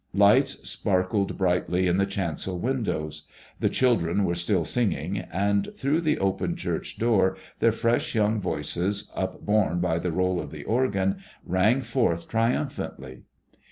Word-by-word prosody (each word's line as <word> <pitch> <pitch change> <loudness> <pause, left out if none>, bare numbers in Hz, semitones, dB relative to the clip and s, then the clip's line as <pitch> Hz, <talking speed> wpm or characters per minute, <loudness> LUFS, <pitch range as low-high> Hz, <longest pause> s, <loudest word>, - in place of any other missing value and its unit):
Lights 125 +8 +4
sparkled 95 0 0
brightly 90 0 +1
in 90 0 +2
the 100 0 +2
chancel 95 -1 -3
windows. 80 - -2 0.3
The - - +2
children 100 -7 +2
were 85 - 0
still 85 0 0
singing, 100 -5 -1
and 100 +2 -1
through 145 +5 +1
the 155 -2 +1
open 95 -2 -1
church - - -4
door 105 -5 +2 0.2
their 115 - +4
fresh 115 +2 0
young 105 0 +2
voices, 100 +2 -1
upborne 95 -2 0
by 85 -2 0
the 90 0 -2
roll 90 +1 0
of - - -7
the 75 -3 -8
organ, 100 - +1 0.3
rang 105 +9 +2
forth 85 -13 0
triumphantly. 110 - -2
95 Hz, 140 wpm, -26 LUFS, 90-110 Hz, 0.3 s, Lights